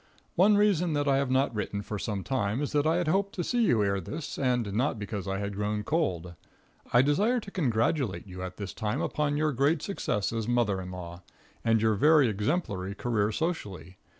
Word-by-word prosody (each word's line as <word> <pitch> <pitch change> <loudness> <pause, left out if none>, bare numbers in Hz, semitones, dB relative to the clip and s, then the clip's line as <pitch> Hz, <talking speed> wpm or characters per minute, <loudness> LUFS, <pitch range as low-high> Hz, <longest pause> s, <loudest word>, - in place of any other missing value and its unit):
One 205 +4 +5
reason 180 -5 +2
that 145 -1 0
I 135 -1 +4
have 140 -1 0
not 130 0 +2
written 105 -1 -3
for 105 0 -5
some 100 -3 -3
time 110 -4 -1
is 145 - -3
that 145 0 +2
I 160 - +3
had 175 -2 0
hoped 195 +4 +1
to 175 - -2
see 240 +6 +1
you 110 - +3
ere 100 -1 0
this, 150 - -6
and 125 -6 0
not 125 +3 0
because 105 -2 -5
I 95 0 -1
had 100 0 -3
grown 105 +1 -2
cold. 90 - -1 0.6
I 120 +1 +6
desire 205 - +2
to 200 -3 -10
congratulate 120 - 0
you 90 -1 -9
at 90 0 -6
this 100 -2 -5
time 110 +5 -2
upon 145 -1 0
your 155 0 +1
great 140 +4 +1
success 105 - -2
as 115 -1 -2
a - - -3
mother 110 -6 +1
in 90 - -7
law, 90 -1 -8 0.4
and 115 -1 +2
your 110 -1 +4
very 150 +5 +5
exemplary 105 - -2
career 110 -3 0
socially. 100 - -4
115 Hz, 210 wpm, -28 LUFS, 100-150 Hz, 0.6 s, I